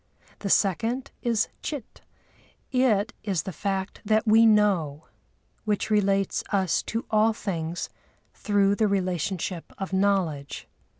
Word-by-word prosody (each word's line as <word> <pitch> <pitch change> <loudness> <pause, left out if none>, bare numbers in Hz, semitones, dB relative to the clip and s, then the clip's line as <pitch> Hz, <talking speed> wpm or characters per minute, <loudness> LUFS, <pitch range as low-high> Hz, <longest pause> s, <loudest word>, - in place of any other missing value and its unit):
The 200 - -3
second 225 +8 +1
is 230 -3 +1
Chit; 285 -7 -6 0.7
it 245 -4 +2
is 190 -6 -1
the 190 - -5
fact 195 +2 -3
that 215 +1 +2
we 225 +1 +6
know, 190 -9 +2 0.6
which 215 0 -1
relates 195 -2 +2
us 190 -5 +1
to 225 +1 -2
all 220 +1 +4
things 170 -6 -3 0.5
through 200 -1 +2
the 215 - +3
relationship 185 -2 -2
of 195 0 -5
knowledge. 190 -8 0
200 Hz, 120 wpm, -26 LUFS, 185-215 Hz, 0.7 s, we